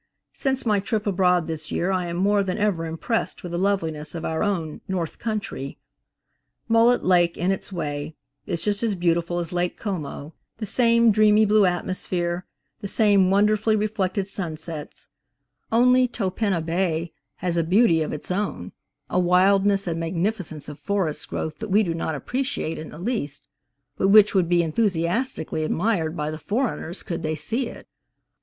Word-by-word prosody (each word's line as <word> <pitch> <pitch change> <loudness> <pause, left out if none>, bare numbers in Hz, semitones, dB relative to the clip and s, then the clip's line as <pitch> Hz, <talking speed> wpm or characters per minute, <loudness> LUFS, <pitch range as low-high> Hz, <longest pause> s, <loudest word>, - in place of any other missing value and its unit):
Since 265 -1 -1
my 210 -3 +3
trip 205 +2 -2
abroad 180 -3 +2
this 160 -1 -5
year 180 +3 0
I 185 -2 0
am 170 0 -4
more 200 +2 +3
than 185 0 -2
ever 200 -6 0
impressed 165 +8 -2
with 175 - -6
the 175 - -2
loveliness 165 -6 -1
of 165 - -4
our 160 0 -1
own 175 -7 -2
"North 180 -4 -3
Countree." 205 - -4 0.9
Mullet 230 +2 +4
Lake, 175 -2 +3
in 180 +2 +1
its 195 - -3
way, 150 -3 -4 0.3
is 170 - -2
just 205 -1 0
as 225 -3 0
beautiful 170 -1 0
as 170 0 -3
Lake 175 0 -1
Como; 160 -6 -5 0.2
the 220 - -4
same 235 +1 +4
dreamy 215 +1 +5
blue 210 -1 +4
atmosphere, 175 0 -2 0.3
the 200 - -5
same 200 -3 +4
wonderfully 210 +2 +3
reflected 200 -2 -1
sunsets; 160 -5 -6 0.6
only 250 +2 +5
Topinabée 185 -6 -1 0.2
has 175 -1 -2
a 170 - +2
beauty 180 -1 +4
of 155 - -2
its 150 - -5
own, 185 - -2 0.4
a 180 - 0
wildness 195 +2 +3
and 165 -2 -2
magnificence 165 -2 -2
of 145 0 -8
forest 185 -2 -2
growth 155 - -4
that 220 -1 -5
we 205 +3 +4
do 170 -4 -1
not 165 -1 -2
appreciate 255 - -3
in 155 - -7
the - - -10
least, 175 - -3 0.5
but 195 - +2
which 210 +1 +7
would 185 -4 +2
be 175 -1 +4
enthusiastically 170 - -1
admired 170 -1 0
by 150 0 -2
the 155 - -6
foreigners 205 -5 -2
could 170 -1 -4
they 155 0 -1
see 225 - -1
it. - - -11
185 Hz, 165 wpm, -24 LUFS, 165-210 Hz, 0.9 s, which